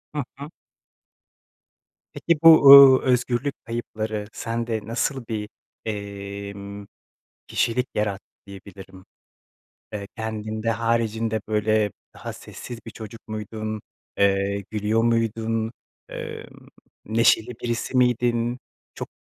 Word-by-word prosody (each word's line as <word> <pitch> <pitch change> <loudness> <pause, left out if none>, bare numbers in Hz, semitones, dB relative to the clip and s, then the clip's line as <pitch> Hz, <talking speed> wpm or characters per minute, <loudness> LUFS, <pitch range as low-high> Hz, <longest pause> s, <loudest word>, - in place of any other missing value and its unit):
Hı 145 - -1
hı. 140 +2 -8 1.6
Peki 170 -3 0
bu, 165 - +11
uuu, 140 -1 +10
özgürlük 125 +2 +1
kayıpları 110 -2 -4
sende 115 -1 -3
nasıl 120 +2 -2
bir, 105 -2 -4 0.4
emm, 100 -1 -6 0.6
kişilik 125 +2 0
yarattı 100 -2 -2 0.2
diyebilirim? 95 -1 -12 0.9
Eee, 100 -1 -5
kendin 110 -1 -4
de 115 - +1
haricinde, 115 -1 0
böyle, 105 -1 +1 0.2
daha - - -7
sessiz 120 -2 -9
bir 115 - -8
çocuk 110 +1 -11
muydun? 110 0 -5 0.4
Eee, 100 0 +1
gülüyor 110 +1 +1
muydun? 115 -1 0 0.4
Emm, - - -8 0.4
neşeli 110 +1 +3
birisi 120 +2 -2
miydin? 120 -1 +2 0.4
Çok - - -6
110 Hz, 100 wpm, -24 LUFS, 105-115 Hz, 1.6 s, bu